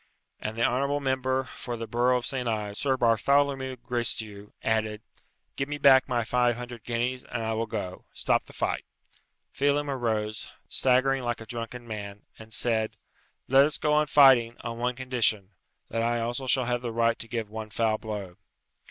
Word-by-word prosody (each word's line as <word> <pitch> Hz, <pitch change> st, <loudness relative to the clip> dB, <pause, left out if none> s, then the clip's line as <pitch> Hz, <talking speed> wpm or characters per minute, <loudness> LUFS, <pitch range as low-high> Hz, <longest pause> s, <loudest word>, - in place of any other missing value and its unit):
And 110 Hz, +1 st, -5 dB
the 115 Hz, -, +1 dB
honourable 140 Hz, +3 st, +1 dB
member 130 Hz, -1 st, 0 dB
for 120 Hz, -2 st, -7 dB
the 115 Hz, -, -4 dB
borough 120 Hz, +2 st, +2 dB
of 120 Hz, -, -4 dB
Saint 130 Hz, -3 st, -2 dB
Ives, 105 Hz, -2 st, -2 dB
Sir 135 Hz, -2 st, +1 dB
Bartholomew 130 Hz, +3 st, +2 dB
Gracedieu, 115 Hz, -4 st, -2 dB
added, 110 Hz, -1 st, 0 dB, 0.5 s
"Give 135 Hz, +1 st, -2 dB
me 145 Hz, -, -3 dB
back 135 Hz, -2 st, +6 dB
my 120 Hz, -2 st, +1 dB
five 120 Hz, +1 st, +2 dB
hundred 120 Hz, -1 st, -8 dB
guineas, 125 Hz, +2 st, -2 dB
and 115 Hz, -2 st, -4 dB
I 110 Hz, 0 st, -1 dB
will 115 Hz, +1 st, -1 dB
go. 100 Hz, -5 st, -5 dB
Stop -, -, +1 dB
the -, -, -14 dB
fight." -, -, -1 dB, 0.7 s
Phelem 145 Hz, +1 st, +1 dB
arose, 110 Hz, -4 st, -2 dB, 0.2 s
staggering 130 Hz, +1 st, +2 dB
like 120 Hz, -1 st, -2 dB
a 115 Hz, -, -9 dB
drunken 120 Hz, +1 st, -6 dB
man, 105 Hz, -2 st, -7 dB, 0.2 s
and 110 Hz, 0 st, -12 dB
said, 110 Hz, -1 st, 0 dB, 0.5 s
"Let 135 Hz, +2 st, +6 dB
us 150 Hz, +1 st, 0 dB
go 150 Hz, -1 st, +1 dB
on 150 Hz, 0 st, +3 dB
fighting, 130 Hz, -5 st, +6 dB
on 115 Hz, -1 st, -5 dB
one 125 Hz, +1 st, 0 dB
condition 115 Hz, -6 st, 0 dB, 0.4 s
that 115 Hz, -, 0 dB
I 120 Hz, +1 st, +1 dB
also 120 Hz, +3 st, -2 dB
shall 130 Hz, -1 st, +3 dB
have 120 Hz, 0 st, -1 dB
the 120 Hz, -2 st, -3 dB
right 115 Hz, 0 st, +1 dB
to 115 Hz, -, -7 dB
give 115 Hz, -2 st, -4 dB
one 110 Hz, 0 st, -6 dB
foul 110 Hz, 0 st, 0 dB
blow." 100 Hz, -4 st, -6 dB
120 Hz, 180 wpm, -27 LUFS, 110-130 Hz, 0.7 s, back